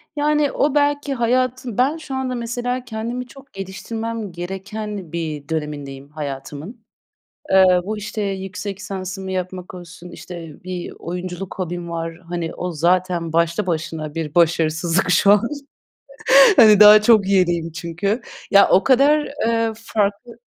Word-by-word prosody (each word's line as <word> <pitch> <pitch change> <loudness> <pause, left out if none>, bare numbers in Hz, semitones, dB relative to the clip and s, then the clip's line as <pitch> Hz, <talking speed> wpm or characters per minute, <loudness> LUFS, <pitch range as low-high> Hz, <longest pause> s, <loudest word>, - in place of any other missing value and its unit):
Yani, 295 -1 +1
o 290 0 0
belki 290 -1 +1
hayatın 255 -1 -1
Ben 275 +6 +2
şu 275 -4 -7
anda, 260 -1 -2
mesela, 245 +1 -3
kendimi 235 +2 -5
çok 275 +2 -16
geliştirmem 220 +3 -5
gereken 195 +1 -6
bir 155 -4 -5
dönemindeyim 145 -3 -5
hayatımın. 150 - -7 0.6
Eee, 190 0 +7 0.2
bu, 215 +2 -3
işte, 215 +1 -5
yüksek 195 0 -4
lisansımı 190 -1 -6
yapmak 185 0 -5
olsun, 175 0 -11
işte, 170 -4 -10
bir 180 -1 -6
oyunculuk 180 +2 -6
hobim 175 -1 -4
var. 165 0 -4 0.2
Hani, 170 -2 -3
o 180 0 -4
zaten 175 0 0
başlı 170 +4 +1
başına 160 -2 -3
bir 160 -3 -4
başarısızlık 165 +1 +2
şu 190 +3 +5
an. 205 0 +5 1.2
Hani, 215 -5 +7
daha 210 0 +9
çok 215 -3 +4
yeniyim 175 -4 +1
çünkü. 180 +8 -2 0.3
Ya, 200 0 +6
o 190 - +4
kadar, 285 +3 +4 0.2
eee, 230 -1 +1
farklı 220 +1 -2
190 Hz, 135 wpm, -20 LUFS, 170-230 Hz, 1.2 s, daha